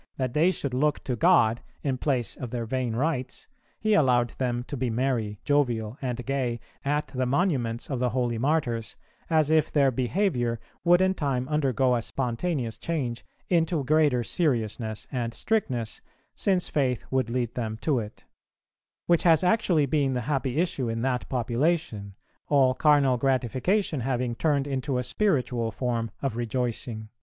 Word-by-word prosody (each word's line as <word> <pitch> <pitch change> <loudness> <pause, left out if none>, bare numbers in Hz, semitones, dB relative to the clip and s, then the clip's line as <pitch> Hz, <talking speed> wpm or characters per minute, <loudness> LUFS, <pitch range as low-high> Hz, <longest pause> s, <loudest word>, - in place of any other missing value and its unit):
that 130 -2 -2
they 160 +4 +4
should 140 -7 -3
look 150 +3 +1
to 125 - -2
God 120 -6 +4 0.2
in 135 -3 0
place 130 -5 -1
of 125 - -6
their 120 -1 -3
vain 125 -1 -2
rites, 130 -1 -2 0.3
he 215 0 +1
allowed 125 -9 +4
them 120 -2 -1
to 140 - -6
be 130 -1 -1
merry, 115 -4 -1
jovial, 120 -6 +1
and 125 -2 -3
gay 130 -3 -1 0.2
at 145 +2 0
the 130 -1 -1
monuments 125 -6 0
of 135 -4 -3
the 125 0 +1
holy 120 -1 -1
Martyrs, 120 -6 0 0.3
as 155 -2 +3
if 160 -1 +3
their 140 -3 +3
behaviour 125 - 0 0.2
would 175 +1 +5
in 190 0 +3
time 135 -7 -1
undergo 135 -4 +2
a 120 - 0
spontaneous 125 0 -2
change 130 -8 -3 0.2
into 165 -3 +1
greater 145 -3 +3
seriousness 110 - -1
and 120 -3 -3
strictness, 130 - -1 0.3
since 185 -3 +1
faith 130 -5 0
would 130 -3 +1
lead 120 -1 -1
them 110 -3 -3
to 145 -6 +1
it; 105 -2 -8 0.8
which 170 -1 +3
has 165 -1 +5
actually 180 -5 +3
been 140 -1 +1
the 125 - -1
happy 135 +1 -1
issue 165 -8 0
in 115 +1 -2
that 125 -2 -1
population, 120 - -1 0.3
all 135 -3 +4
carnal 140 -3 +4
gratification 135 - 0
having 125 -1 -1
turned 140 +2 +1
into 135 -1 -2
a 125 - 0
spiritual 125 - 0
form 120 -2 -2
of 135 -5 -1
rejoicing." 120 -2 -3
130 Hz, 160 wpm, -26 LUFS, 120-150 Hz, 0.8 s, would